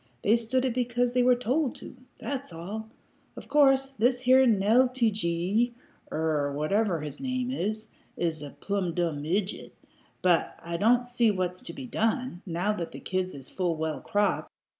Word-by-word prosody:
They 215 - +5
stood 245 +3 0
it 255 - 0
because 245 0 0
they 250 - +3
were 250 0 +5
told 250 +3 0
to. - - -11 0.2
That's 280 -4 -4
all. 200 +7 -6 0.5
Of - - -10
course 270 -2 +4
this 250 0 +1
here 260 +1 +6
Neel 225 +4 +4
te 245 -3 +1
gee, 205 +5 0 0.4
er 155 -3 0
whatever 175 +4 0
his 150 -2 -6
name 255 -1 -2
is, 215 -2 -2 0.3
is 165 -3 -1
a 145 - -6
plumb 190 0 -3
dumb 165 -5 -1
ijit, 185 +6 -2 0.5
but 180 -2 +2
I 170 0 -3
don't 240 +6 +3
see 245 -2 +3
what's 185 -2 -1
to 255 - -7
be 275 - -7
done, 230 -4 -1
now 180 +5 0
that 170 -5 -5
the - - -7
kids 185 -1 -2
is 135 -2 -9
full 175 -3 -1
well 155 -1 -3
cropped. 205 0 0
215 Hz, 175 wpm, -28 LUFS, 175-250 Hz, 0.5 s, here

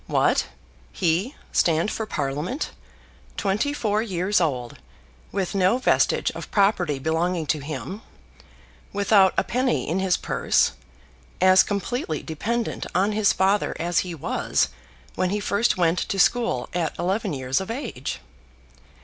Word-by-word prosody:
What! - - +2 0.4
he 175 - 0 0.2
stand 165 +4 +2
for 220 - -3
Parliament, 150 - -3 0.7
twenty 210 +8 0
four 215 -7 0
years 190 -2 0
old, 125 -7 -2 0.5
with 195 -3 -2
no 195 +4 +3
vestige 260 - +2
of - - -8
property 190 -7 +2
belonging 160 +4 0
to 155 +1 0
him, 155 +8 -6 0.9
without 200 -1 +4
a - - +3
penny 250 +1 0
in 170 +5 0
his 190 -2 +2
purse, - - +1 0.7
as 185 0 +7
completely 200 - -2
dependent 225 +9 -3
on 195 +4 +3
his 210 -1 +3
father 195 +2 +1
as 170 +1 +1
he 180 -2 -3
was 150 - 0 0.4
when 185 - 0
he 205 +2 -1
first 205 +2 +1
went 170 0 +2
to 195 - -2
school 195 - +2
at 170 -2 -2
eleven 190 +3 -1
years 130 +1 -1
of 190 - -6
age! 230 - -4
190 Hz, 135 wpm, -24 LUFS, 165-210 Hz, 0.9 s, as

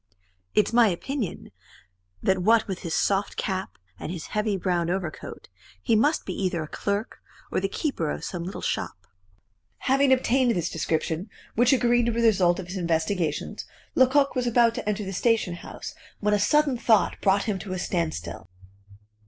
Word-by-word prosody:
"It's 210 - +3
my 235 -1 +6
opinion, 215 - -3 0.7
that 190 0 +2
what 220 +3 +4
with 190 -3 -4
his 170 -3 -3
soft 200 0 0
cap 190 -1 -3 0.2
and - - -5
his 170 -4 -6
heavy 210 -1 0
brown 175 -2 0
overcoat, 180 -3 -4 0.3
he 230 - +1
must 290 +9 +2
be - - -3
either 175 -3 0
a - - -7
clerk 200 +7 -3 0.3
or - - +1
the 195 +1 -1
keeper 195 - -2
of - - -4
some 175 -2 -4
little 185 +3 -6
shop." - - -3 0.8
Having 270 +1 +3
obtained 255 -2 +3
this 175 0 -1
description, 165 +4 -2 0.2
which 240 +2 +4
agreed 240 -2 +3
with 235 - 0
the 230 - +7
result 180 -4 +3
of 190 - -5
his 180 +2 -6
investigations, 165 -1 -1 0.3
Lecoq 275 +2 +4
was 250 -1 -1
about 235 -1 +4
to 210 - -3
enter 210 0 -1
the 195 - -5
station 225 -2 +1
house - - -8 0.3
when 210 0 +1
a 205 - +3
sudden 285 +3 +3
thought 225 -2 +3
brought 195 +1 +3
him 205 -4 -2
to 185 0 -6
a - - -2
standstill. 85 - -3
200 Hz, 175 wpm, -26 LUFS, 175-235 Hz, 0.8 s, the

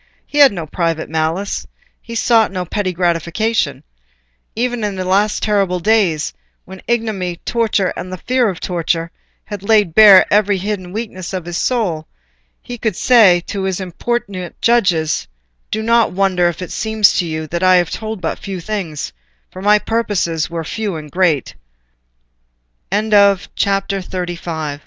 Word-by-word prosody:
He 295 - -3
had 280 -2 +8
no 175 -5 -5
private 165 0 -2
malice—he 170 +7 -4
sought 225 -2 +3
no 185 -2 -3
petty 190 +1 -2
gratification. 180 +5 -1 0.7
Even 240 0 -1
in 205 -2 -2
the 185 -1 -4
last 200 +3 +1
terrible 195 -4 +1
days, 190 - +1 0.3
when 190 0 -11
ignominy, 215 -7 -1
torture, 220 -6 0
and 185 - -6
the 185 - -5
fear 250 +4 +1
of 180 - -5
torture, 170 -1 -2 0.3
had 205 -2 -7
laid 205 -4 +2
bare 200 -1 +8
every 205 -1 +3
hidden 190 -2 -4
weakness 200 -4 -6
of 185 -3 -4
his 175 0 -3
soul, 185 -11 -1 0.6
he 245 -1 -8
could 220 -5 -1
say 205 -8 +5
to 195 +3 -5
his 190 -1 -2
importunate 190 -1 -4
judges: 180 - +1 0.4
"Do 220 +1 -2
not 230 0 +3
wonder 185 -2 +2
if 175 +2 -6
it 180 - -8
seems 220 -2 +2
to 175 - -1
you 155 0 -4
that 170 +2 -3
I 185 0 +5
have 175 -2 +2
told 220 -3 -5
but 165 - -3
few 195 -2 -6
things; 175 - -4 0.4
for 185 - -9
my 210 +1 +5
purposes 205 -8 -1
were 165 -1 -4
f 220 - -6
190 Hz, 140 wpm, -17 LUFS, 175-220 Hz, 0.7 s, had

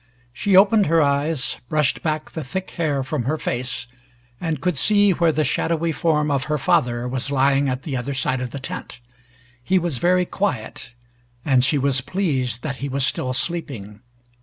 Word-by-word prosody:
She 195 +8 +1
opened 200 +1 +5
her 165 +2 +4
eyes, 145 -1 0
brushed 150 -4 +1
back 155 -1 -2
the 160 - -5
thick 190 +8 -5
hair 150 -5 -1
from 135 -2 -3
her 155 +4 0
face, 125 -3 -3 0.5
and 160 -4 -2
could 180 +4 0
see 205 +8 +4
where 170 -2 +2
the 155 0 0
shadowy 165 +4 0
form 150 -2 +1
of 135 -2 0
her 150 0 0
father 125 -2 +1
was 130 +2 -2
lying 140 0 +2
at 130 +1 -3
the 145 -5 -4
other 130 +2 -3
side 130 -1 0
of 125 - -3
the 140 - -7
tent. 135 - -7 0.6
He 185 +8 +2
was 170 -8 -1
very 180 +3 +3
quiet, 120 - -3 0.5
and 130 -4 +4
she 150 +2 +2
was 135 -1 +1
pleased 130 - -2
that 140 -4 -3
he 140 +1 -4
was 135 0 +1
still 130 -1 -1
sleeping. 125 - -3
140 Hz, 185 wpm, -22 LUFS, 130-165 Hz, 0.6 s, opened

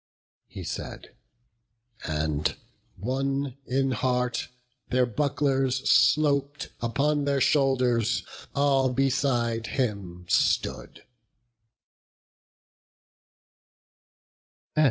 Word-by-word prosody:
He - - -8
said; - - -7 0.9
and, 75 -1 -1 0.4
one 135 +4 -2
in 135 +1 +1
heart, 125 0 0 0.4
their 125 0 +3
bucklers 135 +1 0
slop'd 145 -1 +3
Upon 140 +5 0
their 140 -1 +1
shoulders, 125 -5 +2 0.3
all 135 -2 +3
beside 125 -4 +1
him 100 -8 -3
stood. - - 0
130 Hz, 65 wpm, -26 LUFS, 120-140 Hz, 0.9 s, their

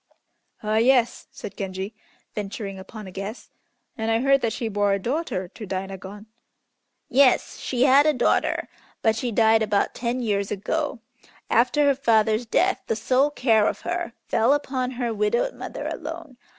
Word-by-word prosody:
"Ah, 215 +1 +1
yes," 240 +1 +3
said - - -9
Genji, 190 +1 -5 0.4
venturing 200 -1 -5
upon 215 +2 -9
a 190 - -9
guess, 195 +5 -7 0.4
"and 220 0 -2
I 225 0 +2
heard 275 0 +4
that 230 - 0
she 230 +1 -3
bore 205 -1 +1
a - - +2
daughter 240 - -2
to 215 +2 -9
Dainagon." 195 +2 -6 0.8
"Yes, 265 0 +3
she 250 -1 0
had 275 +2 +6
a - - +6
daughter, 250 - +1 0.4
but 220 -1 +3
she 240 +2 -2
died 220 0 +4
about 210 -2 +1
ten 245 +1 -2
years 200 -4 -1
ago. 280 +6 -2 0.5
After 250 +5 +3
her 280 - +5
father's 225 -3 +2
death - - +2
the - - 0
sole 255 +6 +2
care 230 -7 +3
of - - -2
her 350 -7 -3
fell 240 +6 +3
upon 265 -3 -2
her 245 -2 -2
widowed 215 - 0
mother - - -7
alone. 265 -6 -6
225 Hz, 165 wpm, -24 LUFS, 205-255 Hz, 0.8 s, had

